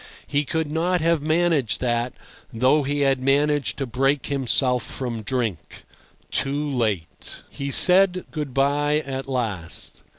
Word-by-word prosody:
He 145 Hz, +1 st, -1 dB
could 160 Hz, +3 st, -1 dB
not 170 Hz, +4 st, 0 dB
have 165 Hz, -1 st, +2 dB
managed 155 Hz, -5 st, +1 dB
that, 120 Hz, 0 st, -1 dB, 0.4 s
though 130 Hz, +6 st, +3 dB
he 145 Hz, +1 st, -2 dB
had 135 Hz, -2 st, +2 dB
managed 145 Hz, +1 st, +1 dB
to 135 Hz, -, -2 dB
break 135 Hz, +3 st, 0 dB
himself 130 Hz, -2 st, +1 dB
from 120 Hz, 0 st, -5 dB
drink—too 130 Hz, -, -3 dB
late. 110 Hz, -10 st, -3 dB
He 140 Hz, 0 st, -5 dB
said 185 Hz, +4 st, +5 dB
good 150 Hz, -4 st, -4 dB
bye 145 Hz, +3 st, +1 dB
at 135 Hz, -1 st, -5 dB
last. 110 Hz, -10 st, -4 dB
135 Hz, 130 wpm, -23 LUFS, 125-150 Hz, 0.4 s, said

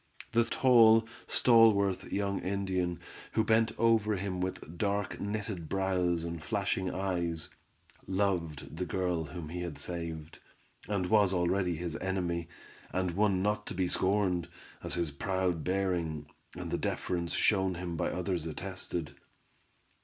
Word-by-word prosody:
The 115 Hz, 0 st, +3 dB
tall, 115 Hz, -4 st, +6 dB, 0.2 s
stalwart, 100 Hz, -5 st, +4 dB
young 100 Hz, -1 st, 0 dB
Indian, 95 Hz, -2 st, -1 dB, 0.3 s
who 110 Hz, -, +3 dB
bent 110 Hz, +1 st, +3 dB
over 110 Hz, -2 st, +3 dB
him 95 Hz, -1 st, -3 dB
with 90 Hz, -3 st, -4 dB
dark, 100 Hz, +1 st, -1 dB
knitted 100 Hz, -5 st, -3 dB
brows 90 Hz, -3 st, +1 dB
and 85 Hz, -1 st, -4 dB
flashing 100 Hz, -1 st, -1 dB
eyes, 85 Hz, -4 st, -2 dB, 0.6 s
loved 85 Hz, -6 st, -1 dB
the 90 Hz, 0 st, -2 dB
girl 90 Hz, -2 st, -1 dB
whom 85 Hz, -1 st, -7 dB
he 90 Hz, +2 st, -4 dB
had 85 Hz, -1 st, -5 dB
saved, 85 Hz, -2 st, -4 dB, 0.5 s
and 100 Hz, -2 st, 0 dB
was 100 Hz, 0 st, +4 dB
already 90 Hz, 0 st, +1 dB
his 85 Hz, 0 st, -4 dB
enemy, 90 Hz, -3 st, -2 dB, 0.4 s
and 90 Hz, -1 st, 0 dB
one 95 Hz, 0 st, +2 dB
not 105 Hz, 0 st, 0 dB
to -, -, -5 dB
be 90 Hz, 0 st, +1 dB
scorned, 95 Hz, -2 st, +1 dB, 0.4 s
as -, -, -1 dB
his 85 Hz, -3 st, -1 dB
proud 90 Hz, +2 st, -1 dB
bearing, 90 Hz, -5 st, -1 dB, 0.3 s
and -, -, -6 dB
the -, -, 0 dB
deference 85 Hz, -2 st, -2 dB
shown 95 Hz, -3 st, +2 dB
him 85 Hz, -1 st, -4 dB
by -, -, 0 dB
others 90 Hz, -2 st, -2 dB
attested. 90 Hz, -1 st, -5 dB
95 Hz, 140 wpm, -31 LUFS, 85-100 Hz, 0.6 s, tall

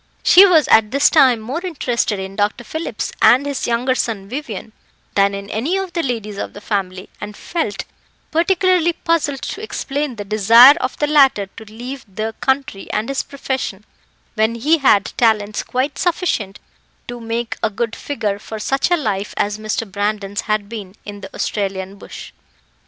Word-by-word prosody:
She 390 Hz, +2 st, +8 dB
was 325 Hz, -5 st, +4 dB
at 220 Hz, -1 st, +5 dB
this 280 Hz, +4 st, +3 dB
time 250 Hz, -4 st, +5 dB
more 255 Hz, +10 st, -4 dB
interested 245 Hz, -, -1 dB
in 190 Hz, 0 st, -6 dB
Dr. 205 Hz, +3 st, -1 dB
Phillips 315 Hz, +7 st, -4 dB
and 260 Hz, +4 st, +6 dB
his 280 Hz, -2 st, -2 dB
younger 240 Hz, +2 st, +1 dB
son 220 Hz, -6 st, -2 dB
Vivian 230 Hz, -4 st, -6 dB, 0.4 s
than 200 Hz, 0 st, +2 dB
in 200 Hz, 0 st, -7 dB
any 285 Hz, -, -1 dB
of 380 Hz, -2 st, -4 dB
the 340 Hz, -, 0 dB
ladies 220 Hz, -7 st, -4 dB
of -, -, -5 dB
the -, -, -9 dB
family, 190 Hz, -3 st, -3 dB
and 210 Hz, -1 st, -7 dB
felt 270 Hz, -, -3 dB, 0.5 s
particularly 350 Hz, 0 st, +2 dB
puzzled 320 Hz, -5 st, -1 dB
to 410 Hz, -, -5 dB
explain 290 Hz, -, -3 dB
the 205 Hz, -2 st, -6 dB
desire 225 Hz, +6 st, +8 dB
of 255 Hz, -, -3 dB
the 295 Hz, -, +1 dB
latter 275 Hz, -8 st, +4 dB
to 220 Hz, +3 st, -13 dB
leave 245 Hz, +5 st, -8 dB
the 220 Hz, +3 st, -3 dB
country 265 Hz, -7 st, -1 dB
and 215 Hz, +4 st, -2 dB
his 275 Hz, -, 0 dB
profession, 260 Hz, -7 st, -4 dB, 0.5 s
when 220 Hz, +1 st, +1 dB
he 300 Hz, +8 st, +2 dB
had 210 Hz, -7 st, +3 dB
talents 215 Hz, -3 st, +2 dB
quite 265 Hz, +3 st, -2 dB
sufficient 330 Hz, -, -1 dB, 0.5 s
to 240 Hz, 0 st, -7 dB
make 230 Hz, 0 st, -3 dB
a 220 Hz, -, +1 dB
good 225 Hz, +2 st, -3 dB
figure, 210 Hz, -8 st, -3 dB
for 220 Hz, -, -7 dB
such 270 Hz, +8 st, 0 dB
a 350 Hz, -, +3 dB
life 205 Hz, -, -3 dB
as 205 Hz, +1 st, -1 dB
Mr. 215 Hz, +1 st, -2 dB
Brandon's 205 Hz, +1 st, -2 dB
had 215 Hz, -2 st, -1 dB
been 205 Hz, -4 st, -8 dB
in 205 Hz, -1 st, -8 dB
the -, -, -9 dB
Australian 195 Hz, -1 st, -3 dB
bush. -, -, -10 dB
230 Hz, 175 wpm, -19 LUFS, 205-280 Hz, 0.5 s, She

